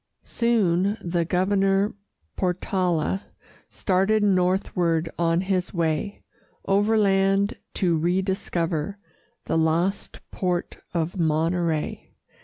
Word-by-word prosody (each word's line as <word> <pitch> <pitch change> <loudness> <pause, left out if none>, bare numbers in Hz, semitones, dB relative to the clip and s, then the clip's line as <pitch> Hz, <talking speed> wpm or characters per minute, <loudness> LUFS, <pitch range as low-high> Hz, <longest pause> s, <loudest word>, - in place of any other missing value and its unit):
Soon, 205 -4 +1
the 170 -1 -1
Governor 195 +3 +1 0.4
Portala 180 -1 0 0.5
Started 195 +3 +1
northward, 180 -4 +1
on 165 0 +2
his 185 -1 -1
way 165 +4 -1 0.4
Overland, 200 -1 +2 0.2
to 175 -4 +2
rediscover 175 -1 -1 0.5
The 160 - +1
lost 165 +5 0
port 180 -2 -2
of 170 +2 -2
Monterey. 165 0 -1
185 Hz, 80 wpm, -24 LUFS, 170-195 Hz, 0.5 s, on